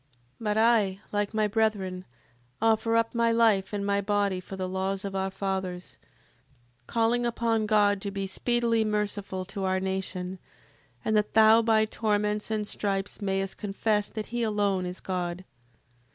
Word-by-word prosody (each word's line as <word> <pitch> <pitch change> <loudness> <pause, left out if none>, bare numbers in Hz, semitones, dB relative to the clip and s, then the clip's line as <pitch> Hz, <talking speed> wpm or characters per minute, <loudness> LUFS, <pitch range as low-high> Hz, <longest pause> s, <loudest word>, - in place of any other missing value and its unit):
7:37. 135 - -40 0.4
But 210 0 +1
I, 220 -4 +3
like 205 0 0
my 215 -1 +2
brethren, 200 -4 -1 0.5
offer 225 0 +2
up 230 0 +2
my 235 -1 +2
life 225 -4 +3
and 200 -1 -2
my 200 0 +1
body 200 -2 0
for 190 +1 -8
the 185 -1 -3
laws 190 +2 -2
of 195 -1 -4
our 190 0 0
fathers: 190 -2 -4 0.9
calling 235 +1 +1
upon 230 -2 0
God 205 -2 +3
to 200 - -3
be 195 0 -3
speedily 230 +3 +1
merciful 205 -3 -2
to 195 +1 -5
our 190 0 +1
nation, 190 -1 -3 0.7
and 220 - +1
that 210 0 +1
thou 220 +1 +7
by 220 -1 +3
torments 210 -1 -1
and 215 -1 -1
stripes 200 -1 -3
mayst 195 -1 -1
confess 210 0 0
that 215 -1 -5
he 240 - 0
alone 205 -4 0
is 180 +1 -7
God. 180 -1 -3
205 Hz, 160 wpm, -27 LUFS, 190-220 Hz, 0.9 s, thou